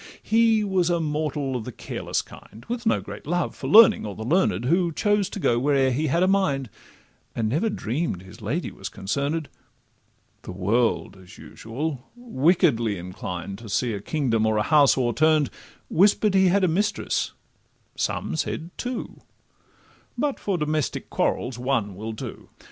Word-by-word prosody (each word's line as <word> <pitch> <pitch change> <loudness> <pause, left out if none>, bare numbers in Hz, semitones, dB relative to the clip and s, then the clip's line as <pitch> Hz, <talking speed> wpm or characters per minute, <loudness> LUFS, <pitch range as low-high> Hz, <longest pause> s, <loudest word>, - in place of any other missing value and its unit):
He 225 -1 +3
was 190 -4 +1
a 170 -1 +1
mortal 150 -3 -2
of 120 - -3
the - - -6
careless - - -3
kind, 110 - -14
With 240 -1 -3
no - - +2
great - - -9
love 175 +2 -1
for - - -6
learning, 225 +1 +7
or 105 -2 -5
the 110 - -6
learn'd, 125 - +1
Who 170 +4 +2
chose 205 +3 +1
to 200 - -6
go 120 -9 +2
where'er 135 0 +2
he 150 +5 0
had 170 +6 +2
a - - +3
mind, 140 - +1 0.6
And 115 -2 0
never 160 - +1
dream'd 135 - -3
his 95 - -14
lady - - -2
was - - -7
concern'd; 140 +10 -2 0.9
The - - -8
world, 105 +3 0
as 95 +3 -15
usual, 130 +4 -5
wickedly 140 - +2
inclined 90 +1 -6
To 115 -2 -10
see 115 +3 0
a 100 - -4
kingdom 115 -6 0
or 110 -1 +1
a 105 - +2
house 145 -1 +5
o'erturn'd, 150 +4 +2 0.4
Whisper'd 205 +3 +3
he 190 -1 +5
had 195 +2 +3
a - - +5
mistress, 205 +5 0 0.6
some - - -2
said 160 +1 -3
two— 250 -1 -5 1.0
But 290 -2 -1
for 195 -3 -1
domestic 150 -3 -2
quarrels 125 -1 -1
one 120 -6 0
will 110 +3 -5
do. 110 - -8
145 Hz, 165 wpm, -24 LUFS, 115-185 Hz, 1.0 s, learning